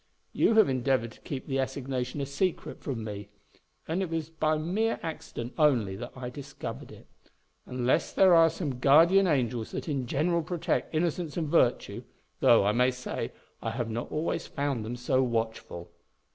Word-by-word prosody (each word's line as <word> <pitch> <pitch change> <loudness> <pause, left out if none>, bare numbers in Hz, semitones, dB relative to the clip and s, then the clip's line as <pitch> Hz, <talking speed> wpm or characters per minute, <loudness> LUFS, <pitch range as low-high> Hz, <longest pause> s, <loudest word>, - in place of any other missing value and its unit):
You 225 - +3
have 220 -3 +7
endeavoured 130 -3 0
to - - -17
keep 135 -3 -5
the 135 -2 -1
assignation 130 0 -3
a - - -1
secret 160 +6 -2
from 125 -6 -4
me; 105 -1 -6 0.6
and 170 +4 -1
it 185 - -2
was 165 -1 -3
by 155 -1 +1
mere 195 +9 0
accident 155 -7 -6
only 120 -11 +3
that 120 +5 -7
I 125 -1 -6
discovered 140 +2 -7
it; - - -14 0.6
unless 125 +5 0
there 190 -2 +5
are 165 -1 +7
some 150 -6 -4
guardian 165 +9 +6
angels 125 -7 0
that - - -4
in 135 -5 -2
general 170 +6 +1
protect 165 0 -2
innocence 165 0 -1
and 160 -3 -1
virtue; 130 -6 +2 0.4
though, - - +5
I 105 - +4
may 125 +3 +3
say, 125 0 -4 0.3
I - - -2
have 115 0 -3
not 115 +2 -4
always 165 +2 -2
found 140 -5 -2
them 115 +3 -4
so 125 +2 +1
watchful." 110 -8 -3
135 Hz, 175 wpm, -28 LUFS, 120-160 Hz, 0.6 s, have